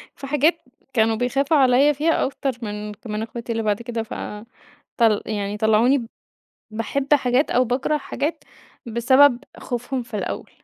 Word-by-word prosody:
في 275 - -8
حاجات 300 +4 +2 0.4
كانوا 225 -2 +3
بيخافوا 270 +6 +1
عليّا 270 +2 +5
فيها 310 +4 +1
أكتر 270 0 -2
من 210 -1 -5
ك 210 - -14
من 210 0 -3
اخواتي 235 +1 -6
اللي 225 -1 -1
بعد 210 +1 0
كده، 235 -1 -4
ف - - -9 0.8
طل 225 -3 +3
يعني 205 -1 -3
طلعوني 220 +5 +3
ب 235 - -6 0.6
باحب 265 +6 0
حاجات 255 0 +2
أو 255 - +3
باكره 255 +5 0
حاجات 295 +2 -4 0.4
بسبب 245 +3 +4 0.2
خوفهم 250 +1 -3
في 230 -2 -7
الأول. - - -5
245 Hz, 160 wpm, -22 LUFS, 220-275 Hz, 0.8 s, عليّا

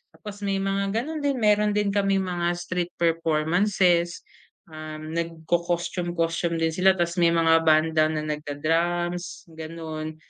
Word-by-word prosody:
Tapos 210 -1 -9
may 195 0 0
mga 195 +1 -1
ganun 305 +7 -2
din, 285 -1 0
meron 210 0 +3
din 210 -1 +1
kaming 195 -1 +1
mga 175 -1 -1
street 175 0 -4
performances, 170 +2 +1 0.5
um, 155 0 -8
nagco-costume, 170 +1 -2
costume 170 0 0
din 165 0 0
sila. 185 +3 +3
Tapos 170 0 -1
may 170 - +5
mga 165 -1 +4
banda 155 0 +4
na 155 -1 -2
nagdra-drums, 165 +4 -2
gan'on. 160 -1 -6
170 Hz, 135 wpm, -25 LUFS, 160-190 Hz, 0.5 s, may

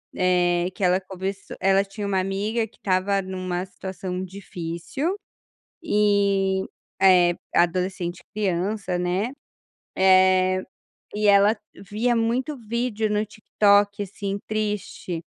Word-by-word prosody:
eh, 180 -1 +2
que - - -6
ela 180 +1 +4
começou 190 +1 -6
ela 195 +1 +3
tinha 200 +1 -6
uma 195 -1 +1
amiga 205 +4 -1
que 225 - -26
estava 195 +1 +1
em 190 -1 -5
uma 185 0 -3
situação 190 -1 -5
difícil, 185 - -4 0.7
eh 200 - +2 0.7
eh, - - -6 0.2
adolescente 180 0 0
criança, 200 -1 -1
né, 180 +6 -1 0.7
eh, 185 0 +4 0.5
e 210 0 +1
ela 200 +2 +5 0.2
via 215 +5 -1
muito 240 +6 0
vídeo 230 -2 -2
no 210 +1 0
TikTok 205 0 +2
assim 200 0 -4
triste, 210 -5 -3
195 Hz, 115 wpm, -24 LUFS, 185-210 Hz, 0.7 s, ela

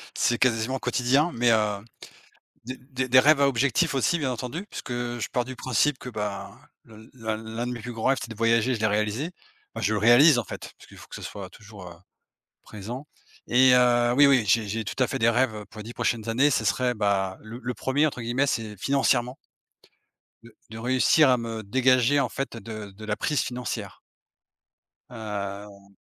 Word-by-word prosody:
c'est 120 - +1
quasiment 125 +1 +1
quotidien. 130 +7 +1
Mais, 120 0 +3
heu, 105 -2 +1 0.8
des 130 +1 -5
des 130 +2 +7
rêves 145 +2 +5
à 140 - +5
objectif 140 +6 +1
aussi 135 +6 +1
bien 140 -5 -2
entendu 125 - -5
puisque - - -7
je 120 -1 -3
pars 125 -1 0
du 130 +1 -7
principe 130 +3 0
que, 125 - -8
ben, 105 -3 -4 0.4
l'un 110 0 -7
l'un 115 +2 -5
de - - -3
mes 120 - -7
plus 120 +3 -7
grands 115 -1 -5
rêves 135 0 +3
c'est 115 - -7
de 110 - -7
voyager, 115 +2 +2
je - - -6
l'ai 110 - +2
réalisé. 110 - -1 0.4
Ben, - - -5
je 110 - +1
le 105 - 0
réalise, 120 +6 +6
en - - -2
fait, - - -8
parce - - -17
qu'il - - -16
faut - - -13
que - - -10
ce - - -8
soit 100 -3 -7
toujours, 100 -1 -13
heu, - - -12 0.7
présent 115 +7 -8 0.4
et 130 +1 +5
heu, 120 -1 +4
oui, 145 +1 +7
oui 130 -5 +4
j'ai 110 +2 +2
j'ai 110 +3 -3
tout 100 - -4
à - - 0
fait 135 - -4
des 115 0 +4
rêves, 120 0 +1
heu, 105 -1 -8
pour 110 - -14
les - - -6
10 115 +3 -9
prochaines 115 -2 -2
années 130 +6 +3
ce 115 - +1
serait, 125 +3 +1
bah, 100 -3 -1
le 110 +3 -9
le 125 +1 -3
1er 130 +6 0
entre 130 -4 -6
guillemets 120 +5 0
c'est 110 -5 -3
«financièrement» 130 +1 +1 1.1
de 115 -2 -17
de 110 - -9
réussir 130 +5 +3
à 125 - +4
me 115 -2 -5
dégager, 130 +5 +3
en 130 - -1
fait, 135 0 -5
de 110 -3 -8
de 105 +3 -11
la 105 0 -2
prise 150 +6 0
financière. 120 -6 -5 1.1
Heu 100 -3 -7
120 Hz, 205 wpm, -25 LUFS, 110-130 Hz, 1.1 s, des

